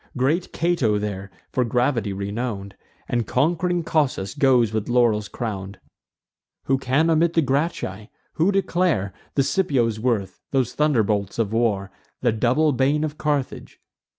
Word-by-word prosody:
Great 150 Hz, +8 st, 0 dB
Cato 160 Hz, -11 st, +1 dB
there, 100 Hz, -2 st, -4 dB, 0.2 s
for 125 Hz, -, +1 dB
gravity 120 Hz, -2 st, 0 dB
renown'd, 100 Hz, 0 st, -4 dB, 0.3 s
And 120 Hz, -3 st, -1 dB
conqu'ring 175 Hz, +5 st, +1 dB
Cossus 140 Hz, -12 st, 0 dB
goes 130 Hz, -6 st, +3 dB
with 110 Hz, 0 st, -2 dB
laurels 115 Hz, -4 st, +2 dB
crown'd. 100 Hz, -4 st, -5 dB, 0.8 s
Who 135 Hz, 0 st, +1 dB
can 135 Hz, +5 st, +2 dB
omit 165 Hz, +1 st, +3 dB
the 165 Hz, -, +3 dB
Gracchi? 130 Hz, -, -2 dB, 0.2 s
who 170 Hz, +5 st, +2 dB
declare 175 Hz, -, 0 dB, 0.2 s
The 140 Hz, -, +3 dB
Scipios' 130 Hz, -, +1 dB
worth, 110 Hz, -6 st, -1 dB
those 130 Hz, -3 st, 0 dB
thunderbolts 110 Hz, -10 st, +1 dB
of 110 Hz, -2 st, -1 dB
war, 105 Hz, -4 st, 0 dB, 0.3 s
The 120 Hz, -, +3 dB
double 125 Hz, +8 st, +2 dB
bane 140 Hz, +3 st, +1 dB
of 155 Hz, -1 st, -4 dB
Carthage? 145 Hz, -3 st, -2 dB
125 Hz, 135 wpm, -23 LUFS, 105-150 Hz, 0.8 s, goes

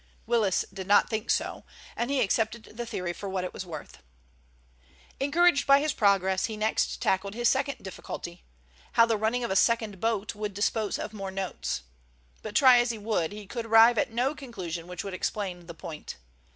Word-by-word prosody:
Willis 220 Hz, -6 st, +2 dB
did 190 Hz, -1 st, -6 dB
not 205 Hz, +3 st, +4 dB
think 220 Hz, 0 st, -3 dB
so, -, -, 0 dB, 0.3 s
and 240 Hz, -, -2 dB
he 275 Hz, -2 st, +1 dB
accepted 220 Hz, +1 st, 0 dB
the 240 Hz, 0 st, -5 dB
theory 180 Hz, -5 st, -3 dB
for 200 Hz, +2 st, -6 dB
what 190 Hz, -1 st, -2 dB
it 180 Hz, -, -5 dB
was 185 Hz, -, -6 dB
worth. 155 Hz, -3 st, -9 dB, 1.2 s
Encouraged 295 Hz, +2 st, +3 dB
by 275 Hz, 0 st, +7 dB
his 300 Hz, 0 st, 0 dB
progress, 190 Hz, -2 st, +2 dB
he 220 Hz, -2 st, -6 dB
next 215 Hz, +1 st, 0 dB
tackled 195 Hz, +2 st, 0 dB
his 240 Hz, 0 st, +1 dB
second 275 Hz, +1 st, 0 dB
difficulty—how 170 Hz, -, -3 dB
the 230 Hz, -1 st, +1 dB
running 225 Hz, +4 st, 0 dB
of 235 Hz, -, -2 dB
a -, -, 0 dB
second 220 Hz, -2 st, +2 dB
boat 220 Hz, -3 st, 0 dB
would 210 Hz, -1 st, -5 dB
dispose 210 Hz, 0 st, 0 dB
of 215 Hz, -, -6 dB
more 195 Hz, -2 st, -5 dB
notes. 190 Hz, -, -3 dB, 0.6 s
But 215 Hz, -1 st, -7 dB
try 255 Hz, -3 st, +7 dB
as 240 Hz, 0 st, +2 dB
he 230 Hz, -, -2 dB
would 205 Hz, -6 st, -1 dB
he 210 Hz, 0 st, -8 dB
could 230 Hz, +3 st, -5 dB
arrive 225 Hz, +1 st, +7 dB
at -, -, +1 dB
no 250 Hz, +5 st, 0 dB
conclusion 180 Hz, -, -6 dB
which 180 Hz, 0 st, -6 dB
would 195 Hz, -1 st, -6 dB
explain 185 Hz, -2 st, -3 dB
the 170 Hz, -, -8 dB
point. 165 Hz, -3 st, -8 dB
210 Hz, 190 wpm, -28 LUFS, 190-235 Hz, 1.2 s, by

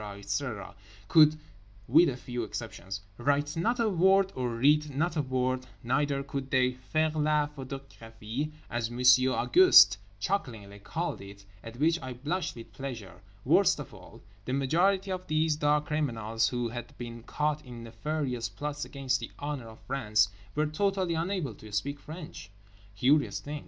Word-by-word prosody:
etc., 100 Hz, -1 st, -4 dB, 0.3 s
could 155 Hz, -1 st, +6 dB, 0.5 s
(with 160 Hz, +6 st, +6 dB
a 125 Hz, -, -4 dB
few 125 Hz, -1 st, -5 dB
exceptions) 100 Hz, -3 st, -6 dB, 0.2 s
write 145 Hz, +3 st, +1 dB
not 230 Hz, +9 st, 0 dB
a 230 Hz, -, +3 dB
word 195 Hz, +1 st, +3 dB
and 125 Hz, -2 st, -2 dB
read 150 Hz, +4 st, +4 dB
not 155 Hz, +5 st, -1 dB
a 155 Hz, -, +2 dB
word; 130 Hz, -1 st, -1 dB, 0.2 s
neither 140 Hz, +3 st, 0 dB
could 135 Hz, -1 st, -5 dB
they 130 Hz, -1 st, +3 dB
faire 155 Hz, +5 st, -1 dB
la 150 Hz, -1 st, +2 dB
photographie 135 Hz, -2 st, -7 dB, 0.2 s
as 120 Hz, -1 st, -2 dB
Monsieur 125 Hz, +1 st, +5 dB
Auguste 365 Hz, -, +7 dB, 0.2 s
chucklingly 110 Hz, -, -3 dB
called 165 Hz, +12 st, -3 dB
it 100 Hz, 0 st, -12 dB, 0.2 s
(at 115 Hz, +1 st, -9 dB
which 165 Hz, +4 st, +2 dB
I 130 Hz, -1 st, -5 dB
blushed 150 Hz, +9 st, -3 dB
with 115 Hz, -1 st, -11 dB
pleasure): 110 Hz, -10 st, -7 dB, 0.2 s
worst -, -, +4 dB
of -, -, -8 dB
all, -, -, -14 dB, 0.2 s
the 125 Hz, -, -3 dB
majority 185 Hz, +8 st, +2 dB
of 185 Hz, 0 st, -4 dB
these 155 Hz, 0 st, +2 dB
dark 150 Hz, 0 st, +2 dB
criminals 115 Hz, -7 st, 0 dB
who 120 Hz, -2 st, -2 dB
had 120 Hz, 0 st, -8 dB
been 120 Hz, -1 st, -7 dB
caught 150 Hz, +5 st, -2 dB
in 120 Hz, -2 st, -9 dB
nefarious 125 Hz, 0 st, -3 dB
plots 145 Hz, +7 st, -5 dB
against 130 Hz, -2 st, -1 dB
the 115 Hz, -, -6 dB
honour 145 Hz, -5 st, -4 dB
of 110 Hz, 0 st, -13 dB
France 110 Hz, -6 st, +1 dB, 0.3 s
were 150 Hz, +1 st, +2 dB
totally 185 Hz, +3 st, 0 dB
unable 165 Hz, -, -2 dB
to 105 Hz, +1 st, -13 dB
speak 140 Hz, +8 st, -2 dB
French. 150 Hz, -, -9 dB, 0.5 s
Curious 140 Hz, +7 st, +2 dB
thing. 150 Hz, +1 st, -6 dB
135 Hz, 155 wpm, -29 LUFS, 120-155 Hz, 0.5 s, Auguste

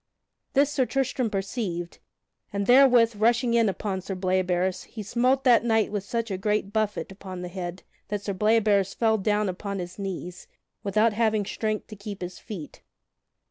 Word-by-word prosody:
This 280 Hz, +1 st, +3 dB
Sir 265 Hz, -4 st, +1 dB
Tristram 260 Hz, -3 st, 0 dB
perceived, 195 Hz, -4 st, -3 dB, 0.5 s
and 200 Hz, 0 st, -1 dB
therewith, 245 Hz, -2 st, +6 dB
rushing 235 Hz, +2 st, +3 dB
in 230 Hz, -2 st, +4 dB
upon 195 Hz, -1 st, -3 dB
Sir 195 Hz, +1 st, -5 dB
Bleoberis, 185 Hz, 0 st, 0 dB
he 215 Hz, -, -8 dB
smote 250 Hz, +6 st, +1 dB
that 245 Hz, -3 st, +5 dB
knight 225 Hz, -2 st, +2 dB
such 230 Hz, +2 st, -3 dB
a 190 Hz, -, -2 dB
great 210 Hz, 0 st, 0 dB
buffet 215 Hz, -2 st, -1 dB
upon 185 Hz, -2 st, -8 dB
the -, -, -4 dB
head 175 Hz, 0 st, -6 dB, 0.2 s
that 205 Hz, -1 st, -3 dB
Sir 200 Hz, -, -2 dB
Bleoberis 210 Hz, -1 st, +2 dB
fell 220 Hz, -2 st, +2 dB
down 210 Hz, +1 st, +1 dB
upon 200 Hz, +2 st, -4 dB
his 180 Hz, +1 st, -6 dB
knees, 185 Hz, -2 st, -6 dB, 0.3 s
without 210 Hz, +3 st, +2 dB
having 215 Hz, -2 st, +1 dB
strength 215 Hz, +1 st, -2 dB
to 215 Hz, -, -10 dB
keep 200 Hz, -2 st, -7 dB
his 180 Hz, 0 st, -7 dB
feet. 190 Hz, -10 st, -9 dB
210 Hz, 165 wpm, -26 LUFS, 190-230 Hz, 0.5 s, therewith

